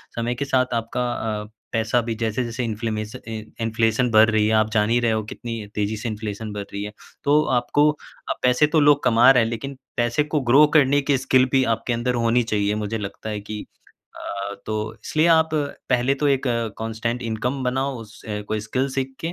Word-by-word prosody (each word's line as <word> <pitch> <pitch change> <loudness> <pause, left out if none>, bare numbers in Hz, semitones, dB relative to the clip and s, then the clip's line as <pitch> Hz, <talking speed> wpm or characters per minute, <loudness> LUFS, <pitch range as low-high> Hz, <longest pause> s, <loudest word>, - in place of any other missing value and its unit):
समय 115 +1 -1
के 140 - -3
साथ 130 -2 +1
आपका 115 +1 -2
अ, 105 -1 -3 0.2
पैसा 115 +1 +1
भी 115 0 -3
जैसे-जैसे 115 +2 -2
इन्फ्लेमेशन 110 -1 -4
इन 110 -1 -7
इन्फ्लेशन 115 +2 +1
बढ़ 110 0 +6
रही 110 -1 +2
है, 110 - +1
आप 110 0 +3
जान 105 -1 +2
ही 120 +1 +3
रहे 120 -1 +2
हो 110 0 0
कितनी 115 -2 -6
तेजी 105 +1 -1
से 115 +2 -4
इन्फ्लेशन 105 0 -5
बढ़ 105 -1 -4
रही 100 0 -3
है, 105 - -5 0.3
तो 150 +2 +4
आपको 145 +5 +3 0.5
पैसे 125 +4 +4
तो 155 +1 +2
लोग 145 -1 +4
कमा 120 +2 +6
रहे 125 -3 +4
हैं 115 - -1
लेकिन 135 +4 -5 0.2
पैसे 120 +5 +2
को 150 +1 -1
ग्रो 140 +5 +8
करने 145 -1 +5
की 140 0 +1
स्किल 130 0 +3
भी 135 -1 +4
आपके 115 +2 -3
अंदर 120 +2 -1
होनी 120 +1 +3
चाहिए, 105 -2 0
मुझे 105 +1 -2
लगता 105 +1 -6
है 105 -1 -3
कि 105 +1 -7 0.5
अ, 100 0 -5
तो 110 0 -3
इसलिए 155 +1 +2
आप 160 -1 +5
पहले 135 -3 0
तो 145 - +3
एक 135 -2 +2 0.4
कांस्टेंट 115 +2 -3
इनकम 120 +4 -2
बनाओ 130 +2 -1
उस 110 -1 -13 0.3
कोई 110 0 -1
स्किल 125 +6 -1
सीख 135 0 -3
के 165 +1 -3
115 Hz, 200 wpm, -23 LUFS, 110-130 Hz, 0.5 s, ग्रो